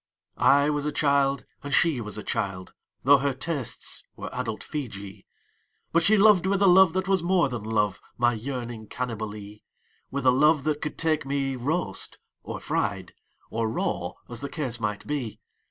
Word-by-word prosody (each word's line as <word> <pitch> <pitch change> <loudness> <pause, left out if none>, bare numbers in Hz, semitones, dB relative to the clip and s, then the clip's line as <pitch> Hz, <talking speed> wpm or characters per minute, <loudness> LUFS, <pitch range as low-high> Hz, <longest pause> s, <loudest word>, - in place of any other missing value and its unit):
I 145 +2 +5
was 145 0 -1
a - - 0
child, 140 -2 +2 0.2
and 145 - -6
she 160 -8 +3
was 105 -1 -7
a 105 - -5
child 95 -2 -3
— - - -50
Tho' 140 +1 +7
her 140 -1 0
tastes 140 -2 -3
were - - -7
adult 110 - -3
Feejee 100 -10 -6 0.3
— - - -45
But 170 - +5
she 215 +6 +5
loved 200 -3 +6
with 195 0 +2
a - - +6
love 185 -2 +7
that 190 +1 -1
was 195 -2 +2
more 175 -3 +2
than 120 -4 -4
love, 105 -2 0 0.2
My 120 0 +3
yearning 120 -2 -5
Cannibalee; 105 -4 -5 0.5
With 140 -1 -3
a 125 - +7
love 150 +3 +4
that 150 0 -1
could 150 - -4
take 160 -2 +1
me 135 -1 -1
roast 130 - -2 0.2
or - - -6
fried - - -2 0.4
Or 115 -1 0
raw, 110 - -2
as 120 -1 -6
the 140 - -4
case 130 -7 -4
might 105 -2 -3
be. 135 -7 -3
135 Hz, 185 wpm, -26 LUFS, 115-155 Hz, 0.5 s, Tho